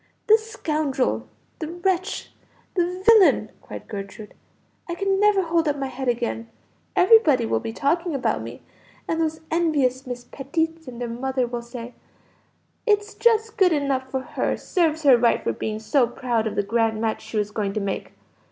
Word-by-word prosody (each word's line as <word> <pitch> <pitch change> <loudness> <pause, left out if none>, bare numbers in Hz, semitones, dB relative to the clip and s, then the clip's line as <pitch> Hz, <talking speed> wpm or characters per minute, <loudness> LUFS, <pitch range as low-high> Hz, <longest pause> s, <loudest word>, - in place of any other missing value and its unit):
"The 440 0 +6
scoundrel! 310 - -1 0.3
the 315 - -3
wretch! 355 +2 -2 0.4
the 360 0 -1
villain!" 445 -5 +6
cried - - -9
Gertrude. 205 0 -8 0.6
"I 345 - -2
can 390 +1 0
never 415 -2 +4
hold 330 -1 +1
up 290 -1 0
my 270 -1 -3
head 260 +1 -5
again; 235 -1 -1 0.5
everybody 360 - +5
will - - 0
be 225 - -5
talking 330 +7 0
about 270 - 0
me, - - -9 0.4
and 325 0 0
those 315 0 -1
envious 285 -6 +1
Miss 245 -1 -5
Petitts 320 +4 -3
and 245 -2 -8
their 245 - -3
mother 255 +2 -1
will 240 0 -4
say, 235 0 -8 0.9
'It's 415 0 +2
just 450 -1 +2
good 370 -5 +5
enough 275 -3 -1
for 265 0 -2
her; - - -2
serves 320 -3 0
her 270 -4 +7
right 235 0 +2
for 115 - 0
being 215 - -3
so 240 +4 +2
proud 235 -2 -1
of 220 - -4
the 205 - +1
grand 225 +1 +1
match 220 -1 -1
she 220 - -6
was 210 0 0
going 205 -2 -2
to 215 - -1
make.' 200 -1 -3
275 Hz, 175 wpm, -23 LUFS, 235-345 Hz, 0.9 s, her